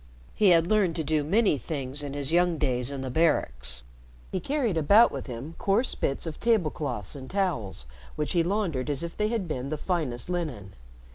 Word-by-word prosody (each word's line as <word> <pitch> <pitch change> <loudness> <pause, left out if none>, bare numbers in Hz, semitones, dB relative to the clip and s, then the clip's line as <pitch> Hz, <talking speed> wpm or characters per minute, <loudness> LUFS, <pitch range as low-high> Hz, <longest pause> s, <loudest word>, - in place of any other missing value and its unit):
He 210 - +3
had 165 -2 +5
learned 190 -3 +2
to 160 - -1
do 155 0 +1
many 195 - +2
things 135 +1 -4
in 145 -1 -5
his 140 0 -1
young 175 -1 +3
days 125 -4 0
in 135 -2 -4
barracks. 150 - +1 0.5
He - - -1
carried 270 - 0
about 200 +9 +6
with - - -6
him 130 +6 -6
coarse 205 +6 +2
bits 135 - -2
of 160 -2 -6
table 215 -9 +2
cloths 125 -9 -4
and 130 -2 -8
towels, 150 - -2 0.3
which 150 - -2
he 170 - +4
laundered 170 -7 -1
as 145 +2 -2
if 170 - -5
they 210 - +1
had 220 -5 -2
been 135 -3 -3
the 155 - -2
finest 150 -9 -2
linen. 145 - -4
155 Hz, 195 wpm, -27 LUFS, 135-180 Hz, 0.5 s, about